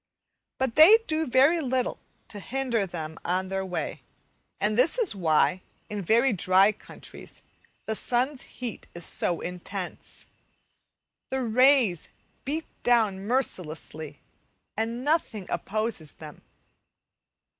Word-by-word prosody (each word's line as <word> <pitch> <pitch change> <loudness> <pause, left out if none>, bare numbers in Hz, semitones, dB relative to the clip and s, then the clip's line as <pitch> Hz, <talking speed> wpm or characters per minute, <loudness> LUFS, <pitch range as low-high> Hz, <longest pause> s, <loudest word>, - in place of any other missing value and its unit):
But 260 -2 -2
they 345 +9 +10
do 315 0 -1
very 275 +7 +4
little 255 -2 -1 0.3
to 205 - -8
hinder 235 -2 -1
them 160 -2 -6
on 185 +2 -1
their 190 0 -2
way, 180 -2 -4 0.6
and 210 +1 +1
this 255 - +3
is 465 -7 +2
why 180 +1 +2 0.3
in 210 -1 -3
very 230 +7 +3
dry 190 +2 +4
countries 215 - -10 0.4
the 220 - -2
sun's 255 +5 -1
heat 245 -3 -7
is 175 -2 +1
so 175 - +1
intense. 180 +1 -6 1.0
The 265 -1 -1
rays 245 - +3 0.4
beat 310 +4 -2 0.2
down 215 -5 +2
mercilessly, 160 - -2 0.6
and 230 +4 -3
nothing 290 - 0
opposes 215 -7 -3
them. 155 -2 -12
220 Hz, 115 wpm, -27 LUFS, 185-260 Hz, 1.0 s, they